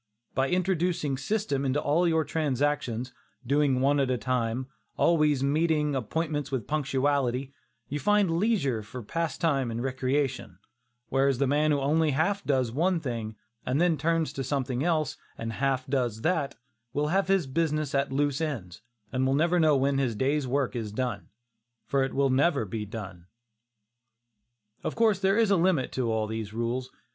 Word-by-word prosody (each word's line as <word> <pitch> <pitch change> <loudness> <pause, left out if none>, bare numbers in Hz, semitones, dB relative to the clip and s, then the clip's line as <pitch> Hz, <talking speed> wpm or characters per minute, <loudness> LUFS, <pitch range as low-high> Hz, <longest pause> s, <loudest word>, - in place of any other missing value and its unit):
By 135 +1 +1
introducing 180 -5 0
system 140 0 -1
into 135 +1 +1
all 160 +5 +2
your 160 -1 +2
transactions, 140 -5 -1 0.3
doing 140 -1 +2
one 140 +2 +3
thing 140 - +3
at - - -5
a 130 - +1
time, 125 +1 -1 0.3
always 150 -5 +3
meeting 150 +1 +1
appointments 145 +4 -2
with 130 -6 -2
punctuality, 140 -2 0 0.3
you 145 - -3
find 200 0 +2
leisure 155 - +1
for 120 +3 -8
pastime 150 -1 -1
and 115 +1 -3
recreation; 130 -6 -1 0.5
whereas 135 -1 +2
the 140 - +2
man 150 +3 +2
who 145 -1 +2
only 155 +3 +2
half 195 +8 +1
does 130 -4 +1
one 170 +7 +1
thing, 115 -6 -4 0.3
and 130 +3 0
then 175 -1 +3
turns 165 +1 0
to 135 - -3
something 130 -1 -1
else 155 -4 0 0.2
and 115 0 -4
half 130 +1 0
does 125 -5 -1
that, 160 -3 0 0.4
will 150 +1 0
have 195 +3 +1
his 190 -4 +2
business 155 +1 -1
at 140 0 +1
loose 145 +2 0
ends, 115 - -4 0.3
and 130 0 +1
will 135 - +2
never 170 +4 +2
know 155 -3 +4
when 135 +1 +1
his 125 -5 0
day's 135 +4 0
work 135 0 0
is 110 -3 -3
done, 125 +3 -3 0.6
for 140 -1 +1
it 135 - -2
never 140 +3 +2
will 110 - -4
be 105 +2 -4
done. 95 -5 -8 1.6
Of - - -3
course 220 -4 +3
there 195 +2 +2
is 225 -3 +3
a 195 - +5
limit 170 -6 +2
to 125 -3 -1
all 110 -1 0
these 110 -1 -5
rules. 120 +3 -2
140 Hz, 170 wpm, -28 LUFS, 130-160 Hz, 1.6 s, a